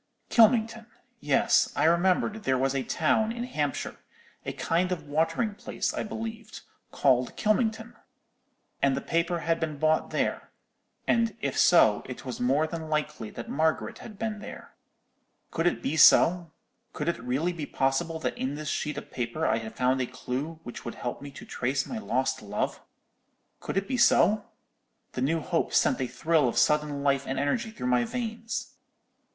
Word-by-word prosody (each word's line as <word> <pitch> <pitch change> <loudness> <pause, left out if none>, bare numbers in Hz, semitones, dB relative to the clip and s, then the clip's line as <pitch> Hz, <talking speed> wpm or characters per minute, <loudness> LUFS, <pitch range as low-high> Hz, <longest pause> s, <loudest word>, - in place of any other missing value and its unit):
Kylmington; 230 0 +4 0.3
yes, - - +3
I - - +1
remembered 180 +5 +2
there 130 -8 +1
was 135 +1 +1
a 135 - 0
town 195 - +1
in 235 +1 -4
Hampshire,—a 150 - -5
kind 180 +3 0
of 170 -4 -2
watering 165 +9 0
place, - - -3
I - - -2
believed,—called 215 - -2
Kylmington! 225 +1 0 0.9
And 135 -1 +3
the - - -2
paper 170 +1 0
had 165 0 0
been 155 -2 -3
bought 155 +2 +2
there—and 230 -1 -3
if - - -2
so, 110 -12 +5
it 125 +1 -8
was 125 - -5
more 135 +5 +2
than 160 -1 -6
likely 150 -7 -2
that 120 - -8
Margaret 160 +2 0
had 215 -3 -10
been 220 -1 -3
there. - - -10 0.8
"Could 165 - 0
it - - -1
be 140 - -1
so? 170 +1 +6 0.4
Could 150 - -4
it 170 - +1
be - - -12
really 150 +6 -1
possible 135 +5 0
that - - -2
in 130 +2 -3
this 155 0 -5
sheet 150 -1 -2
of - - -8
paper 125 +6 -2
I - - +2
had 110 -1 -8
found 130 +1 +2
a 125 - -1
clue 130 +5 -5
which 120 - -8
would 120 - -6
help 120 - -5
me 145 - -7
to 135 - -11
trace 130 +2 -1
my 235 - -5
lost 130 - -1
love? 105 0 -3 0.8
Could - - -4
it 195 - 0
be 260 - -1
so? 215 -3 +4 0.7
The - - -4
new 160 +5 +1
hope 170 +1 -1
sent - - +3
a 130 - 0
thrill 150 +3 +1
of 120 - -2
sudden 150 -2 +2
life 140 -1 +1
and 135 - -2
energy 145 - 0
through 220 - -7
my 125 -1 +3
veins. 225 - -4
155 Hz, 170 wpm, -27 LUFS, 135-205 Hz, 0.9 s, so